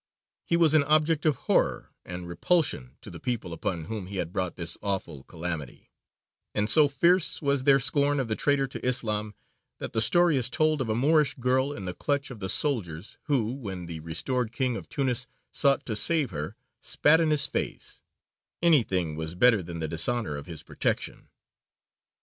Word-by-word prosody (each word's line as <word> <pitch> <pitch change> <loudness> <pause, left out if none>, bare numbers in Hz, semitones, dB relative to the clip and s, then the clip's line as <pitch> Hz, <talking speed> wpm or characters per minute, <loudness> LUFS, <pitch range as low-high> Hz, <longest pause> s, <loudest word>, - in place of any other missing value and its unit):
He 170 - +2
was 165 -3 +4
an 155 -2 +5
object 155 +1 +2
of 150 - +2
horror - - 0
and 90 -1 -7
repulsion 85 - -1
to - - -10
the - - -10
people 120 -9 -4
upon 85 0 -4
whom 105 -1 -6
he 100 - -8
had 90 -2 -4
brought 90 -2 -2
this 85 -1 -2
awful 95 -9 -3
calamity, 80 -5 -7 0.6
and 105 0 +1
so 150 +6 +7
fierce 170 +6 +2
was 140 -3 -1
their 135 -1 +5
scorn 145 +1 +1
of 130 - -2
the 110 - -1
traitor 140 +1 +1
to 135 - -9
Islam 110 -4 -1 0.4
that - - -6
the 110 - +2
story 170 +5 +4
is 125 -2 +2
told 155 0 +1
of 120 - -3
a 110 - 0
Moorish 150 +4 +2
girl 130 +2 0
in 100 -9 -7
the 90 - -4
clutch 140 - -2
of 120 - -9
the 95 -1 -2
soldiers, 100 - 0
who, 125 -6 0
when 95 -9 -7
the 85 -1 -7
restored 110 +10 -2
King 125 0 -1
of - - -8
Tunis 130 -4 -2 0.2
sought 140 -2 +2
to 110 - -3
save 150 +1 +2
her, 75 +5 -5 0.3
spat 160 +2 +4
in 165 -2 +1
his 150 -2 +3
face; - - -5 0.6
anything 95 - +2
was 80 +2 -4
better 110 +1 +4
than 85 -1 -8
the 80 - -2
dishonour 85 +2 +2
of 70 +3 -8
his 80 -3 -8
protection. - - -2
120 Hz, 185 wpm, -26 LUFS, 90-145 Hz, 0.6 s, so